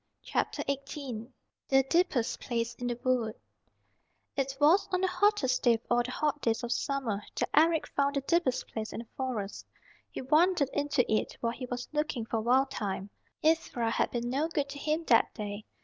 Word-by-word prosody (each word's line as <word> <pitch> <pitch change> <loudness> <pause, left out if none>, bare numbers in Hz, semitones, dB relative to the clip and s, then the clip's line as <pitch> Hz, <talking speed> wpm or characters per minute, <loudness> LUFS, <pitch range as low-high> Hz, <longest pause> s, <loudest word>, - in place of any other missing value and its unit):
CHAPTER - - -1
XVIII 275 -4 -4 0.4
THE 270 0 +5
DEEPEST 275 -5 +1
PLACE 235 -1 -2
IN 245 - -2
THE 240 0 -2
WOOD 245 -4 +1 1.0
It 270 -1 -1
was 315 +7 +5
on 365 0 +1
the 380 - +3
hottest 360 -8 +2
day 240 -2 +5
of 225 - -7
all 240 0 +5
the 240 - -4
hot 295 +2 -1
days 225 0 0
of 240 - -3
summer 245 -6 -1 0.2
that - - 0
Eric 320 0 +4
found 280 0 0
the 275 - +1
deepest 275 -3 +1
place 220 -1 -5
in - - -4
the 235 - -13
Forest. 235 -7 -4 0.4
He - - -6
wandered 305 +1 +3
into 290 -3 +1
it 215 - 0
while 230 -1 0
he 255 0 -6
was 245 0 -4
looking 300 -6 -1
for 225 -1 -1
Wild 260 +4 +3
Thyme. 195 -1 -3 0.3
Ivra 310 -8 +2
had - - +1
been 240 0 -2
no 275 +6 0
good 290 -4 -1
to 285 - -7
him 310 +3 0
that 230 - +4
day. 205 -1 -5
260 Hz, 190 wpm, -30 LUFS, 235-295 Hz, 1.0 s, THE